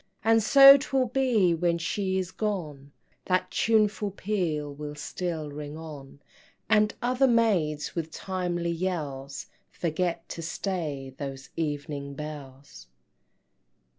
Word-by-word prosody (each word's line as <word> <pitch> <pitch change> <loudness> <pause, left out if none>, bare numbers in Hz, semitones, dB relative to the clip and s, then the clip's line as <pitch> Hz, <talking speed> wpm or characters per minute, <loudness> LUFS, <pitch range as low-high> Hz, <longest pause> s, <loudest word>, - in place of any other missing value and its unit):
And 225 +1 +4
so 275 +5 +9
'twill 270 -1 0
be 235 -8 +2
when 170 +1 +1
she 190 +3 -1
is 185 -1 -2
gone, 155 -11 -4 0.3
That 185 0 0
tuneful 215 -2 +2
peal 175 -8 -2
will 150 +1 -7
still 160 -2 -4
ring 145 +1 -7
on, 145 -4 -10 0.5
And 210 -1 +3
other 255 +2 +3
maids 190 - +1
with 165 -2 -3
timely 175 -1 -2
yells 150 -6 -4 0.2
Forget 170 0 -2
to 165 - -6
stay 160 -6 -4
those 135 -1 -6
Evening 145 -2 -4
Bells. 145 - -9
170 Hz, 115 wpm, -27 LUFS, 150-205 Hz, 0.5 s, so